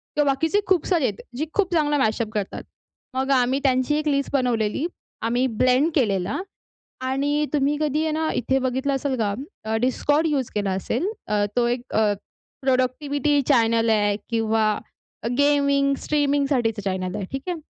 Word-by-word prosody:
किंवा 300 - +3
बाकीचे 320 +9 +1
खूप 365 -4 +2
सारे 340 -7 +2
आहेत. 205 -4 -2 0.2
जे 310 - -1
खूप 400 -3 +1
चांगला 295 -3 +2
मॅशअप 220 -3 +1
करतात. 205 -2 -3 0.5
मग 265 +1 -1
आम्ही 260 +1 +3
त्यांची 260 +2 +2
एक 305 0 -2
लिस्ट 280 -1 0
बनवलेली. 245 0 +1 0.4
आम्ही 240 +3 +1
ब्लेंड 255 +5 +2
केलेला. 205 - +1 0.6
आणि 285 +3 0
तुम्ही 290 0 +2
कधी 300 0 +1
आहे 315 - 0
ना 315 +1 0
इथे 265 +2 +1
बघितलं 260 +2 -1
असेल 270 0 -1
का 205 -2 0 0.5
Discord 290 +5 +2
यूज 275 -5 0
केला 200 -2 0
असेल. 195 - -1 0.2
अ, 210 -1 +1
तो 240 -1 +3
एक 240 0 -1
अ, 215 -1 +3 0.5
प्रोडक्टिविटी 280 +2 +1
चॅनल 230 -4 +3
आहे 205 -2 +3
किंवा 220 -2 +1 0.6
गेमिंग 280 -1 +3
स्ट्रीमिंगसाठीचं 280 -6 +1
तो - - -17
चॅनल 185 0 -3
आहे. 205 -2 -3
ठीक 270 - -3
आहे. 350 - -2
265 Hz, 160 wpm, -23 LUFS, 225-290 Hz, 0.6 s, किंवा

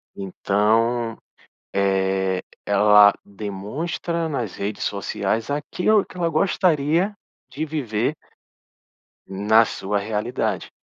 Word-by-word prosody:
Então, 110 +4 0 0.6
eh, 95 -1 +1 0.3
ela 105 0 +6
demonstra 110 - -4
nas 120 - -3
redes 100 +1 -4
sociais 100 +3 -2
aquilo 180 +8 +1
que - - -15
ela 170 -2 0
gostaria 170 +1 +1 0.4
de 140 +5 -3
viver 135 -5 -1 1.1
na 105 +4 +4
sua 100 -2 -2
realidade. 105 0 -2
110 Hz, 90 wpm, -22 LUFS, 100-150 Hz, 1.1 s, ela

